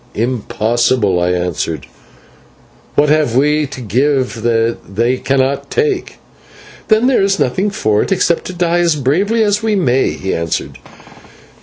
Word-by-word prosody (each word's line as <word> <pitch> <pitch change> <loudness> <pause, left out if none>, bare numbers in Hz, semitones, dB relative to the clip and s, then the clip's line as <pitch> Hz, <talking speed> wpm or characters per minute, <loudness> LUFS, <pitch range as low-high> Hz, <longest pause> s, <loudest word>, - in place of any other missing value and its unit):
"Impossible," 115 -3 0
I 90 +1 +1
answered, 90 -4 -2 1.1
"what 145 0 +3
have 150 -6 +2
we 150 +2 +2
to 135 -1 -9
give 125 +1 0
that 115 0 +1 0.2
they 120 +4 +1
cannot 135 +1 -1
take?" 435 -5 -1 0.7
"Then 220 +2 +3
there 260 -4 +3
is 195 0 +1
nothing 185 +11 0
for 110 - 0
it - - -3
except 175 -3 +1
to 185 - -6
die 175 -1 0
as 170 -2 +2
bravely 190 - +1
as 205 -1 +1
we 220 -1 0
may," 135 -8 +2
he 95 - -4
answered. 85 -1 -3
135 Hz, 145 wpm, -15 LUFS, 115-180 Hz, 1.1 s, what